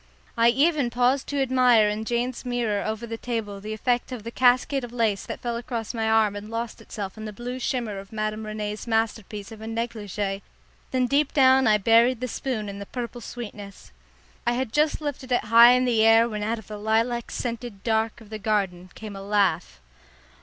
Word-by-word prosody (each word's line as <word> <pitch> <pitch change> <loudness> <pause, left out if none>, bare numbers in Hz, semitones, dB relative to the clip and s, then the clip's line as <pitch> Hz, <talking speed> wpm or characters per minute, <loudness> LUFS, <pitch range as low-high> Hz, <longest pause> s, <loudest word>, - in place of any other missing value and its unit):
I 230 0 +5
even 280 +1 +2
paused 250 +3 +1
to 280 -1 0
admire 250 -4 +4
in 210 +1 -2
Jane's 240 +2 -2
mirror 240 -5 -1
over 220 +2 -3
the 225 -1 -6
table 215 -5 -4
the 215 +2 -6
effect 240 +4 -1
of 245 -4 -6
the 230 - -6
cascade 255 +2 +3
of 240 - -7
lace 225 -5 0
that - - -6
fell 240 -1 -2
across 235 -1 -4
my 225 -1 -1
arm 220 -2 +3
and 205 +1 -7
lost 230 0 -4
itself 205 -1 -7
in 215 - -6
the 215 - -5
blue 245 +4 -6
shimmer 235 -7 -2
of 195 0 -12
Madame 215 0 -3
Rene's 210 +1 -5
masterpiece 220 -2 -2
of 220 -1 -10
a 220 - -7
negligée, 210 -4 -3 0.5
then 255 -1 +1
deep 280 +3 +1
down 265 -2 +5
I 215 -1 +5
buried 230 +4 +4
the 255 - -3
spoon 235 -3 -3
in 200 0 -6
the 200 - -7
purple 240 -1 -6
sweetness. 205 - -9 0.6
I 240 - +3
had 250 -2 -2
just 305 +1 +2
lifted 275 -3 -5
it 245 - +2
high 230 +2 +8
in 250 0 +2
the 230 -3 +3
air 225 +1 +6
when 210 -2 -4
out 225 +3 -1
of 220 - -11
the 210 0 -8
lilac 225 +3 0
scented 235 -4 -5
dark 225 0 0
of 220 -1 -15
the 215 - -5
garden 195 -4 -1
came 215 -2 -8
a 195 - -7
laugh. 195 - 0
225 Hz, 205 wpm, -25 LUFS, 210-245 Hz, 0.6 s, high